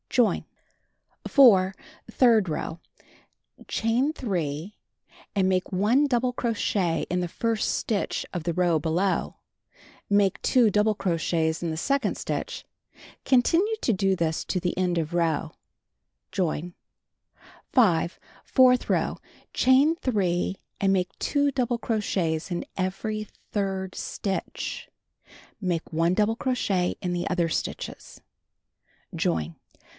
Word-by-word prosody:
Join. 245 -3 +2 0.8
4. 195 -9 +6 0.4
Third 225 -7 +4
row: 160 +1 -4 0.9
Chain 235 +6 +1
3, 180 - -3 0.6
and 190 -2 +3
make 185 0 0
1 220 +10 +3
double 250 -1 +1
cro 235 -1 -1
chet 180 -6 0
in 180 +1 0
the 175 - -3
first 225 +3 -1
stitch 210 -3 -2
of 175 -3 -3
the 170 0 -1
row 175 -1 +2
below. 170 +5 0 0.7
Make 200 -2 +2
2 245 -4 +4
double 210 +1 +2
crochets 165 -3 0
in 170 - -1
the 160 - -3
second 270 +4 0
stitch. - - -4 0.6
Continue 335 - +3
to 235 - +2
do 195 0 +1
this 160 -2 -1
to 185 - -1 0.2
end 180 -2 +1
of 160 0 -2
row. 165 -2 0 0.8
Join. 175 -2 -2 1.0
5. 180 - +3 0.2
Fourth 255 -1 +4
row: - - +1 0.4
Chain 270 +5 +4
3 195 - 0 0.2
and 195 -1 +3
make 185 -1 0
2 285 -1 +1
double 245 -3 -1 0.4
in 170 0 -1
every 210 +3 -3 0.2
third 190 -2 -2
stitch, 195 -2 -4 0.7
(Make 175 -4 -2
1 165 +3 +2
double 215 +2 +2
crochet 200 -8 0 0.5
stitches.) - - -5 1.0
Join. 80 0 -1
195 Hz, 110 wpm, -26 LUFS, 175-230 Hz, 1.0 s, 4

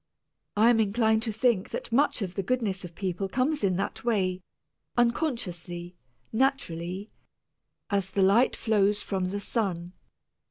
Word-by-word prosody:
I 225 +3 +6
am 230 - +3
inclined 220 +1 +2
to 225 -1 -1
think 220 -3 +1
that - - -5
much 250 -2 +2
of 180 -2 -4
the 195 - -1
goodness 200 -3 -1
of 175 -2 -9
people 190 0 -2
does 190 - -16
come 260 +5 +2
in 190 -3 +2
that 195 +2 -3
way, 190 -6 +1 0.6
unconsciously, 185 - -1 0.4
naturally, 205 -7 -1 0.8
as 195 -2 +1
the 195 0 +1
light 210 +7 +4
flows 210 -2 +2
from 190 -2 -1
the 200 +2 -3
sun. 185 -5 -2
200 Hz, 150 wpm, -28 LUFS, 185-235 Hz, 0.8 s, I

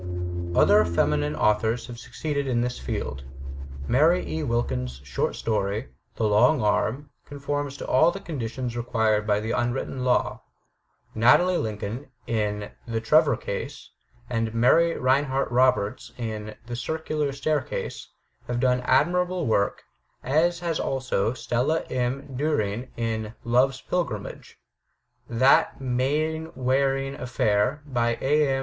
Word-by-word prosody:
Other 105 +1 +6
feminine 75 -3 +1
authors 105 +6 +1
have 120 -1 -9
succeeded 140 +3 -3
in 120 -2 +1
this 125 +1 -2
field. 65 +1 -4 0.6
Mary 160 +8 +3
E. 160 - -3
Wilkins* 65 - -2
short 65 -2 -2
story, 105 +2 -1 0.3
"The - - -2
Long 110 +8 +4
Arm/' 110 +6 0
conforms 145 0 -4
to - - -6
all 160 +6 +5
the 195 - -4
conditions 125 - -4
required 110 -3 +1
by 105 -1 +3
the 110 +2 -3
imwritten 120 +2 -1
law. 125 -1 +1 0.7
Natalie 175 +11 +4
Lincoln, 110 +5 -4 0.2
in 105 -2 -2 0.2
"The 115 -1 -1
Trevor 155 +7 +4
Case,'* - - -6 0.4
and 115 -2 -2
Mary 165 +9 +4
Rinehart 135 +1 +1
Roberts, 125 -3 +1
in 110 -3 -5
"The 120 0 -5
Circular 155 +2 -2
Staircase,'* 140 0 -2 0.4
have 120 0 -1
done 125 0 +2
admirable 180 +1 +2
work, 100 -4 +1 0.4
as 170 +6 +2
has 170 -2 -1
also 130 -5 0
Stella 130 +7 0
M. 130 +2 -2
Diiring 125 -5 -1
in 110 -1 -3
"Love's 125 +3 +2
Privilege." 125 - -4 0.7
"That 125 +3 +4
Mainwaring 135 0 0
Affair," 125 +1 0
by 120 -4 0
A. 150 +2 +3
M. 135 - +1
125 Hz, 125 wpm, -25 LUFS, 110-140 Hz, 0.7 s, Other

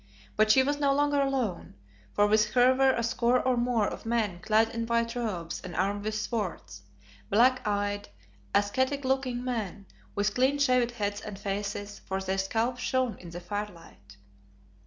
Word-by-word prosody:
But 215 0 +3
she 260 +4 +6
was 290 +2 -1
no 280 -1 +3
longer 290 0 +2
alone, 260 -9 -2 0.4
for 205 - +3
with 215 0 +3
her 250 +1 +5
were 270 +1 +4
a 235 - -1
score 235 +2 +2
or 255 0 +1
more 240 -3 +1
of - - -6
men 225 -6 -1
clad 220 +4 +2
in 230 0 -3
white 230 0 0
robes 190 -9 -3
and 175 -3 -7
armed 200 +4 -1
with 215 0 -2
swords; 210 - -4 0.5
black 255 +4 +4
eyed, 205 0 -1 0.5
ascetic 260 +7 +1
looking 260 -2 0
men, 215 -6 -4 0.3
with 205 +1 +1
clean 265 +3 +2
shaved 255 -4 +3
heads 205 -3 -3
and 210 -2 -7
faces, 205 +1 -4
for 190 0 -4
their 190 0 -2
scalps 230 +6 -1
shone 255 -3 0
in 175 - -10
the 170 +1 -7
firelight. 175 - -7
220 Hz, 170 wpm, -28 LUFS, 205-250 Hz, 0.5 s, she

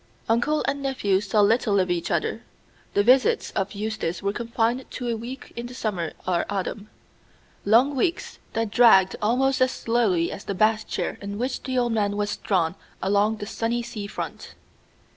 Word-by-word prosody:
Uncle 240 +7 +1
and 280 0 -1
nephew 210 -8 +1
saw 210 +1 +2
little 210 -1 +3
of 185 -1 +1
each 175 -1 -1
other. - - -1 0.5
The 205 - +4
visits 255 +3 +3
of 195 +2 -2
Eustace 210 -5 -3
were 200 0 0
confined 235 +2 -1
to 245 - -5
a 230 - 0
week 240 +4 -8
in 235 0 -5
the 250 - -10
summer 190 -9 -2
or 175 -2 +2
autumn: 205 +1 -4 0.8
long 245 +7 +4
weeks, 335 +6 -1
that 225 -2 -1
dragged 200 -6 +6
almost 260 +5 +2
as 255 - +5
slowly 220 -10 +1
as - - -8
the 200 - -3
bath 215 +2 +2
chair - - -3
in 200 0 -5
which 255 +3 -2
the 260 -1 -3
old 240 -1 +2
man 205 -2 0
was 205 0 -1
drawn 175 -5 0 0.3
along 205 +3 +2
the 205 - -5
sunny 230 +3 -2
sea 215 -4 -6
front. - - -7
220 Hz, 180 wpm, -25 LUFS, 200-240 Hz, 0.8 s, dragged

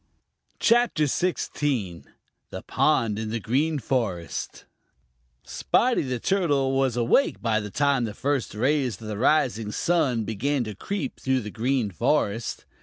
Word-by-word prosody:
CHAPTER 235 -9 +3
XVI: 140 - -1 0.4
The - - -7
Pond 110 -2 +1
In 110 -1 -3
The 115 +1 -2
Green 145 +9 0
Forest 110 - -3 0.8
SPOTTY 250 0 +1
THE 130 -3 -3
TURTLE 145 - +1
was 135 -3 +1
awake 120 - +2
by 115 -2 +1
the 105 -1 -6
time 140 +1 +1
the 105 -1 -6
first 140 -5 -1
rays 130 +1 0
of 110 - -9
the 105 -1 -4
rising 120 -6 +2
sun 140 -7 +1
began 130 +6 -1
to 110 -2 -5
creep 155 - -4
through 130 -1 0
the 105 -1 -7
Green 120 -1 0
Forest. 100 +6 -1
125 Hz, 140 wpm, -25 LUFS, 110-145 Hz, 0.8 s, CHAPTER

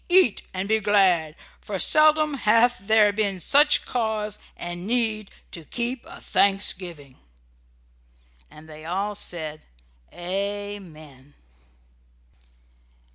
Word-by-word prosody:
Eat 355 - +4
and 190 +1 -3
be 220 +1 +2
glad, 190 -7 +2 0.2
for 200 - -6
seldom 305 - +4
hath 240 -1 +2
there 210 +1 +3
been 200 -3 0
such 290 - +4
cause 220 -3 -3 0.2
and 175 +2 -6
need 220 -3 0 0.2
to 165 - -9
keep 240 - -4
a - - -11
Thanksgiving!" 180 -8 -1 1.3
And 155 +1 -16
they 155 0 -12
all 195 +5 -3
said 155 -6 -5 0.5
Amen! 180 -7 -7
200 Hz, 100 wpm, -23 LUFS, 175-220 Hz, 1.3 s, Eat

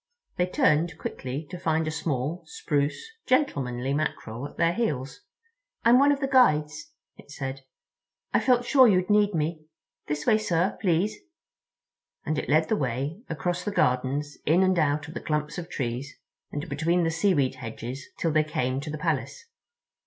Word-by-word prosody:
They 180 - +2
turned 160 -2 +2
quickly 135 +2 -5
to 180 - -6
find 160 -2 0
a - - -1
small, 155 +1 -2
spruce, 145 - -1 0.2
gentlemanly 135 - +1
Mackerel 140 -4 -3
at - - -17
their 170 0 +3
heels. 150 - -2 0.6
"I'm 235 +2 +6
one 285 +1 +5
of 285 0 0
the 270 - +1
Guides," 250 - +3 0.3
it - - -16
said. 135 -1 -5 0.7
"I - - +5
felt 245 -2 +2
sure 260 0 +6
you'd 185 -2 +2
need 210 -2 +3
me. 155 0 -2 0.4
This 150 0 -3
way, 215 - +4
sir, 185 -3 0
please," 185 +2 +1 1.1
and 155 - 0
it - - -5
led 155 +2 +4
the 220 - +1
way 140 - -2
across 175 +4 -2
the - - -2
gardens 140 -2 0
in 170 +5 +4
and 185 -2 +3
out 150 -1 +1
of 155 - -9
the - - -5
clumps 150 +1 -2
of 175 0 -7
trees 130 +1 -4 0.3
and 145 - -4
between 165 +5 +1
the 165 - +1
seaweed 165 -6 +2
hedges 125 +3 -6
till 165 - 0
they 155 0 +3
came 130 -3 -2
to 150 - -6
the 155 - -4
Palace. 145 -4 -2
155 Hz, 170 wpm, -26 LUFS, 140-180 Hz, 1.1 s, I'm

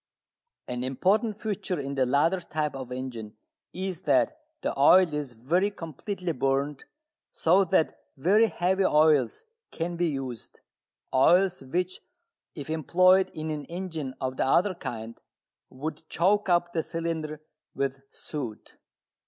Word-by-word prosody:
An 125 0 -3
important 200 - +1
feature 195 -5 -2
in 140 0 -4
the 130 -2 +1
latter 150 +8 +2
type 155 -4 -3
of 130 -2 -7
engine 120 -4 -6 0.4
is 185 -2 -4
that 310 - +2 0.3
the - - 0
oil 165 +4 +6
is 145 -4 -3
very 165 - +1
completely 180 +1 -5
burnt, 135 0 -1 0.5
so 180 +4 +4
that 165 -2 +1 0.2
very 205 +10 +4
heavy 190 +1 +1
oils 150 - +3 0.3
can 170 +1 -4
be 175 0 +1
used, 135 -6 -5 0.5
oils 180 +8 +4
which, 180 +7 -2 0.6
if 145 -3 -7
employed 185 +4 +4
in 155 0 -3
an 150 -2 -4
engine 165 -5 -5
of 130 0 -3
the - - +2
other 185 +8 +3
kind, 115 -8 -7 0.5
would 150 +4 -6
choke 200 +4 +2
up 175 0 +2
the 165 - +1
cylinder 160 -2 -4 0.4
with 135 0 -2
soot. 130 -9 -7
160 Hz, 135 wpm, -27 LUFS, 135-185 Hz, 0.6 s, oil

